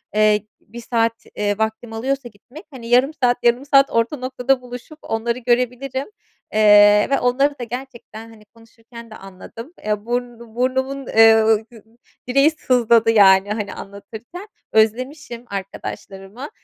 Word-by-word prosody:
eee, 215 -1 +2 0.2
1 235 +3 -12
saat, 230 -1 -1
eee, 205 0 -1
vaktimi 220 +1 -3
alıyorsa 265 +1 -3
gitmek. 250 - -15
Hani, 240 -3 -10
yarım 250 +5 +3
saat, 245 -1 +2
yarım 240 +3 +2
saat 275 -1 +4
orta 230 +6 0
noktada 255 0 -1
buluşup 250 +5 -11
onları 235 +2 -3
görebilirim, 250 +2 -1 0.5
eee, 210 -1 +6
ve 275 - +1
onları 275 +3 0
da - - -4
gerçekten, 235 -2 -9
hani, 215 -2 -18
konuşurken 230 +1 -16
de - - -10
anladım. 225 - -12
Eee, 210 0 -2
burn 245 0 -4 0.2
burnumun, 260 +2 -2
ııı, 220 -1 +4 0.6
direği 275 +5 +3
sızladı, 235 -6 +2
yani, 195 -2 +5
hani, 210 -2 -5
anlatırken 220 - -11 0.3
özlemişim 240 +3 -1
arkadaşlarımı. 195 +4 -8
235 Hz, 135 wpm, -20 LUFS, 220-255 Hz, 0.6 s, eee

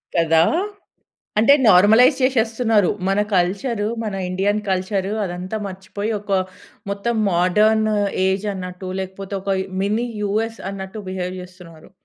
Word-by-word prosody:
కదా! 165 -1 +4 1.0
అంటే 255 +6 +6
నార్మలైజ్ 220 +8 +6
చేసేస్తున్నారు. 225 -5 +2 0.2
మన 195 +2 +2
కల్చర్ 200 +6 0 0.2
మన 210 -3 -3 0.2
ఇండియన్ 200 +3 0
కల్చర్ 190 +1 -1 0.2
అదంతా 185 +3 -5
మర్చిపోయి 200 +3 -5
ఒక 205 -1 -6 0.6
మొత్తం 200 +4 -2 0.2
మాడర్న్ 210 +5 +3 0.4
ఏజ్ 190 +2 0
అన్నట్టు 180 0 -7
లేకపోతే 190 +1 -6
ఒక 200 - -3 0.3
మిని 215 +5 0 0.2
యూఎస్ 220 +3 -1
అన్నట్టు 195 +2 -7
బిహేవ్ 185 -1 -4
చేస్తున్నరు. 180 -3 -13
195 Hz, 115 wpm, -21 LUFS, 185-220 Hz, 1.0 s, అంటే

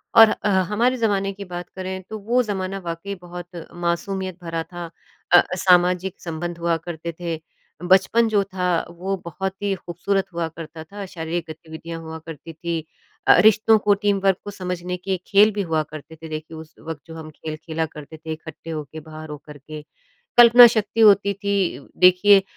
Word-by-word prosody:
और 225 -1 +10
अह 200 -3 +1
हमारे 245 +4 +2
ज़माने 200 -4 +1
की 200 +1 -8
बात 175 -1 -7
करें 190 0 -5
तो 220 - -5
वो 235 +5 +2
ज़माना 195 -3 -3
वाकई 170 +4 -5
बहुत 175 -1 -9 0.2
मासूमियत 185 +1 -2
भरा 165 -1 -3
था। 175 +1 -8 0.4
अ, 175 - +10 0.2
सामाजिक 180 +1 +3
संबंध 170 +1 -5
हुआ 170 0 +1
करते 170 0 -6
थे, 170 -2 -3 0.4
बचपन 190 +6 +4
जो 205 -2 +2
था, 180 -3 -1
वो 180 +3 -3
बहुत 190 +3 -3
ही 200 -1 0
खूबसूरत 190 +2 -2
हुआ 170 -1 -1
करता 160 0 -9
था। 200 +5 -8
शारीरिक 170 -2 -4
गतिविधियाँ 160 +1 -8
हुआ 160 0 -7
करती 165 0 -9
थीं। 165 +1 -3 0.5
अ - - +9
अ, - - +4
रिश्तों 220 +2 +5
को, 205 0 +3
टीम 200 0 +1
वर्क 195 -2 +3
को 205 - -5
समझने 180 -2 -4
के 190 +1 -2
खेल 210 +2 +6
भी 205 - -1
हुआ 160 -1 +1
करते 155 +1 -11
थे 160 0 -10
देखिए, 155 +1 -6
उस 160 0 -11
वक़्त 160 -3 -5
जो 165 - -9
हम 160 -1 -8
खेल 155 0 -6
खेला 160 0 -3
करते 155 0 -11
थे 160 0 -7
इकट्ठे 160 +1 -10
होके 155 -1 -6
बाहर 155 0 -10
हो 150 - -6
करके। 150 +1 -9 0.6
कल्पना 240 0 +10
शक्ति 220 +1 -1
होती 200 -2 +6
थी 200 -2 -1
उ - - -15
देखिए 190 +2 +7
175 Hz, 185 wpm, -22 LUFS, 160-195 Hz, 0.6 s, और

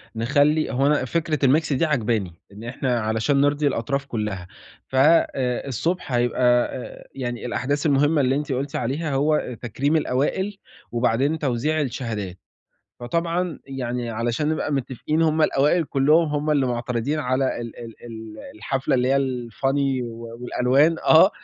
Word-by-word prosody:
نخلّي 145 +7 +2
هو 135 +3 +2
أنا 145 -3 +2
فكرة 155 -1 0
الmix 155 +2 +2
دي 135 - +2
عاجباني، 115 - 0 0.2
إن 105 +3 -11
إحنا 120 0 -1
علشان 110 +6 +1
نرضي 145 +1 +2
الأطراف 140 +2 -1
كلّها. 105 -7 -4 0.4
ف - - -7
آآ، 135 -3 +3
الصبح 165 +5 -2
هيبقى 120 0 0 0.3
آآ، 125 - -9
يعني 120 -3 -4
الأحداث 140 +4 -1
المهمة 145 +1 +3
اللي 130 0 +2
أنتِ 145 0 -3
قُلتِ 135 +2 -2
عليها 140 +5 -2
هو 150 +3 +3
آآ، 125 - -2
تكريم 130 +7 -1
الأوائل 160 +8 0 0.3
وبعدين 125 +6 +1
توزيع 150 +3 0
الشهادات، 110 -8 -4 0.6
فطبعًا 170 +5 -1
يعني 125 -3 -3
علشان 120 +6 -1
نبقى 155 -1 -1
متفقين 140 +4 -1
هُم 160 -1 +2
الأوائل 155 +4 +3
كلّهم 150 +5 +3
هُم 150 +1 -1
اللي 140 -3 +2
معترضين 125 +3 -2
على 130 -3 0
ال 115 -1 -7
ال 115 -2 -9
ال 110 -2 -9 0.2
الحفلة 135 +6 -1
اللي 125 0 +2
هي 135 +1 +3 0.3
الfunny 135 +2 0
و 115 0 -8
والألوان 130 +6 +2
آه، 165 +5 +6
135 Hz, 150 wpm, -23 LUFS, 120-150 Hz, 0.6 s, آه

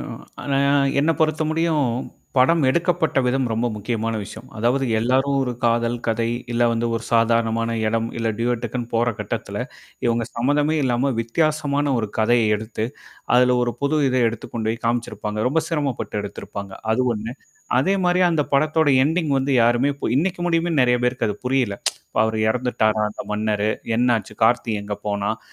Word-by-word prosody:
ஆ. - - -5 0.4
அ - - -9 0.6
என்ன 155 +3 +2
பொறுத்த 155 0 +2
முடியும், 160 -3 +1 0.5
படம் 160 +6 +4
எடுக்கப்பட்ட 170 0 +1
விதம் 125 0 +1
ரொம்ப 115 +2 0
முக்கியமான 110 +1 -2
விஷயம். 110 +4 -10
அதாவது 125 +5 +1
எல்லாரும் 130 +4 +1
ஒரு 130 -2 -1
காதல், 115 0 +2
கதை, 115 0 0 0.2
இல்ல 120 0 +1
வந்து 115 0 0
ஒரு 115 0 -3
சாதாரணமான 115 0 +2 0.2
இடம், 115 +1 0
இல்ல 115 -1 0
டியோடக்குன்னு 120 0 -2
போற 120 +1 +2
கட்டத்தல - - -4 0.5
இவங்க 115 0 +1
சம்மந்தமே 145 +6 +1
இல்லாம 125 +2 +1
வித்தியாசமான 145 +3 0
ஒரு 110 -2 -2
கதைய 115 +1 +3
எடுத்து, 110 +1 -4 0.5
அதுல 125 0 +4
ஒரு 120 - -1
புது 140 +2 +1
இத 130 - 0
எடுத்துக் 115 -1 -8
கொண்டு 110 -2 -2
போய் 115 +1 -5
காமிச்சிருப்பாங்க. 115 -2 -2
ரொம்ப 160 +4 +1
சிரமப்பட்டு 140 -9 -2
எடுத்திருப்பாங்க, 100 -1 -7 0.2
அது 125 +3 +2
ஒண்ணு. 110 +2 -5 0.5
அதே 190 +9 +2
மாரிய 180 +1 +3
அந்த 160 -3 +2
படத்தோட 155 +2 +3 0.2
எண்டிங் 160 +1 0
வந்து 135 +1 0
யாருமே 120 +4 +3 0.2
இ - - 0
இன்னைக்கு 175 +5 0
முடியுமேன்னு 165 -3 +1
நெறைய 125 0 +3
பேருக்கு 125 -1 0
அது 105 - -2
புரியல. 125 -5 +1 0.4
இப்ப - - +2
அவரு 110 0 -1
இறந்துட்டாரா 110 -3 +1
அந்த 105 - -7
மன்னரு, 105 0 0 0.3
என்னாச்சு 115 -4 +1
கார்த்தி 120 +1 +3
எங்க 105 0 -4
போனான், 100 +2 -1
120 Hz, 160 wpm, -22 LUFS, 115-140 Hz, 0.6 s, படம்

